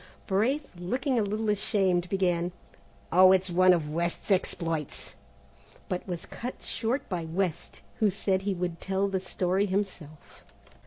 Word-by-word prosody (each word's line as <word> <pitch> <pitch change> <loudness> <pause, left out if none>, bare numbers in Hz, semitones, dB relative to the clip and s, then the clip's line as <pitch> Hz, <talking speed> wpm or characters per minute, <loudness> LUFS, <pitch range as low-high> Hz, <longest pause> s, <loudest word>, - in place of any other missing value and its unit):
Braith, 255 +9 0
looking 245 - -1
a - - +3
little 215 +2 -1
ashamed, 190 -4 +1
began, 180 -2 +1 0.6
"Oh, 185 +2 +8
it's 190 -1 +3
one 185 +1 +6
of 160 -4 +1
West's 170 +4 -1
exploits," 165 -5 -1 0.7
but 180 +1 -3
was 175 -2 -4
cut 250 +2 -7
short 235 +4 -2
by 180 -4 -3
West, 170 +1 -3 0.2
who 215 - +4
said 190 0 0
he 195 0 -1
would 175 -2 -3
tell 195 +1 0
the 195 -1 -1
story 185 +1 0
himself. 185 -6 -5
185 Hz, 145 wpm, -28 LUFS, 175-205 Hz, 0.7 s, Oh